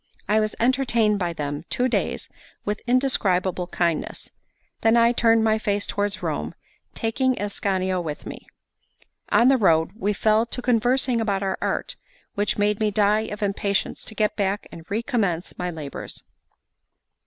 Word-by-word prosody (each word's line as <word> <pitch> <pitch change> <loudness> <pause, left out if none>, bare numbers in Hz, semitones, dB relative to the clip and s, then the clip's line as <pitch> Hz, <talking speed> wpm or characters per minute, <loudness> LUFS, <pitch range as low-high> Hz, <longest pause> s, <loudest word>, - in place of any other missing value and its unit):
I 210 +2 +3
was 215 0 -1
entertained 235 -4 +2
by 175 -2 -1
them 145 -1 -4
two 250 - +1
days 250 - -1 0.4
with 210 +1 -2
indescribable 190 -8 +2
kindness; 170 -3 -2 0.5
then 225 +1 +4
I 235 0 +5
turned 230 -2 +3
my 220 0 +2
face 205 -2 0
towards 205 0 -2
Rome, - - -3 0.4
taking 255 +3 0
Ascanio 190 -2 -1
with 155 -3 -6
me. - - -9 0.8
On 235 - +5
the 270 0 +5
road 165 -7 +3
we 210 -2 -1
fell 215 +2 +2
to 245 - -2
conversing 245 0 +2
about 200 -3 0
our 190 - -2
art, - - -2 0.4
which 205 0 -1
made 205 0 +1
me 215 -1 +2
die 210 +1 +2
of 210 +1 -5
impatience 200 0 -1
to 220 - -6
get 210 -1 +1
back 200 0 -1
and 165 0 -12
recommence 205 -6 -1
my 180 0 -1
labours. 155 -5 -7
210 Hz, 155 wpm, -24 LUFS, 190-230 Hz, 0.8 s, I